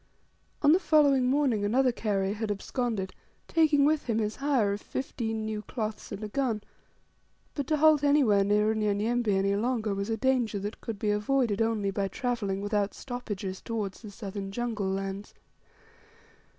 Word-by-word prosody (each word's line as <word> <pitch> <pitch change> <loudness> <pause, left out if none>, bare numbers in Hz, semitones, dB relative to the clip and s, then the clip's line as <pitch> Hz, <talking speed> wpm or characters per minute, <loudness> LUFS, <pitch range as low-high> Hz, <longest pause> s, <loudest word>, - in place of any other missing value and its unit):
On 290 - +7
the 345 - +5
following 285 -7 +4
morning 260 -6 +2
another 250 +5 +3
carrier 200 -4 -1
had 220 0 -3
absconded, 205 -1 -2 0.3
taking 310 -4 +4
with 305 0 +2
him 225 -2 +1
his 215 -1 -1
hire 265 -8 +1
of 205 - -5
fifteen 225 -4 -3
new 215 -1 -3
cloths 215 -1 -5
and 205 +1 -6
a - - -2
gun 225 -2 -1 0.9
but 285 -3 -3
to 310 - +2
halt 305 -1 +5
anywhere 270 -9 +4
near 210 +2 +3
Unyanyembe 215 +3 0
any 195 0 +2
longer 220 -1 0
was 200 +2 -3
a 225 - 0
danger 245 -4 +1
that 205 +2 -5
could 225 -3 -5
be 210 +1 0
avoided 210 0 +1
only 220 -3 +1
by 195 0 -1
travelling 200 -2 -2
without 205 0 -1
stoppages 205 -7 -5
towards 210 -4 -4
the 215 - -9
southern 195 -1 -6
jungle 220 -3 -2
lands. 195 +1 -4
220 Hz, 165 wpm, -28 LUFS, 200-255 Hz, 0.9 s, On